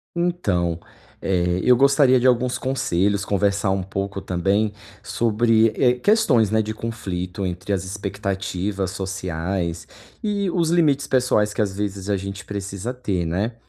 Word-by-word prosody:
Então, 100 - 0 0.4
eh, 90 -1 +1
eu 125 - +6
gostaria 135 0 +5
de 125 - +3
alguns 125 0 +2
conselhos, 100 -7 0
conversar 100 0 +1
um 95 -1 0
pouco 100 +1 -4
também 95 +4 0 0.3
sobre, 115 +1 +2
eh, 125 -1 +4
questões, 140 - +3
né, 110 +1 +2
de 110 0 -3
conflito 95 -5 -4
entre 90 +2 -4
as 95 - -1
expectativas 95 -1 -3
sociais 90 -2 -3 0.4
e 200 -2 0
os 170 -2 +1
limites 150 -5 +2
pessoais 125 -5 +2
que - - -1
às 100 -2 -1
vezes 100 -1 -4
a 100 - +2
gente 100 +1 -6
precisa 100 +3 -5
ter, 100 -9 -2
né, 100 +8 -1
100 Hz, 145 wpm, -22 LUFS, 95-125 Hz, 0.4 s, eu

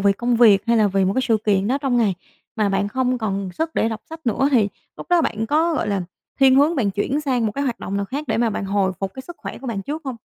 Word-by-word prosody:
vì 200 0 +4
công 240 +3 0
việc 215 -5 +6
hay 235 - +3
là 215 -2 +4
vì 195 0 +1
một 190 - +1
cái 260 - +1
sự 225 -2 +3
kiện 200 -1 +2
đó 270 - +1
trong 270 -3 0
ngày 215 -5 +2 0.4
mà 210 -2 +1
bạn 195 +1 0
không 255 +2 0
còn 195 -3 -3
sức 320 - -3
để 225 - +1
đọc 225 0 -5
sách 320 -3 -10
nữa, 265 +5 +2
thì 225 -7 +3 0.3
lúc - - -9
đó 350 -1 +4
bạn 220 -4 -2
có, 320 +5 +2
gọi 220 - -1
là, 200 -2 0 0.4
thiên 265 -1 +6
hướng 295 +5 +4
bạn 220 -7 +1
chuyển 210 +9 -1
sang 255 -6 0
một 210 - -2
cái 280 +5 -2
hoạt 250 -4 -2
động 195 - -4
nào 200 - -1
khác 280 +8 -5
để - - +1
mà 235 -1 +1
bạn 200 - -3
hồi 195 -1 0
phục 195 -1 -3
cái 260 - -7
sức 345 - -9
khỏe - - -7
của 265 - -9
bạn 210 -5 -3
trước 300 +8 -5
hông? 260 -3 -4
230 Hz, 305 wpm, -21 LUFS, 200-270 Hz, 0.4 s, việc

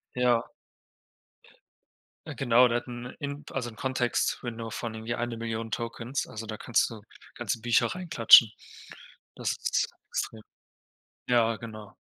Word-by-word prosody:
Ja. 125 -2 +3 1.8
Äh, - - -6
genau, 125 -1 +5
der 120 0 +1
hat 120 - -6
'n 120 0 -7
In 140 0 -5
also 125 -3 -3
'n 110 - -14
Context 130 -1 0
Window 115 -2 -5
von 115 0 -4
irgendwie 110 +1 -4
eine 120 -1 -3
Million 115 0 -4
Tokens. 115 +3 -3
Also 110 +1 -7
da 110 0 -5
kannst 120 - +1
du 110 -2 -9 0.3
ganze 115 -1 -3
Bücher 120 -1 +3
reinklatschen. 140 - +7 0.8
Das - - -1
ist - - 0 0.2
extrem. 110 - -3 0.9
Ja, 115 -2 +3
genau. 110 -1 -9
115 Hz, 140 wpm, -28 LUFS, 115-125 Hz, 1.8 s, reinklatschen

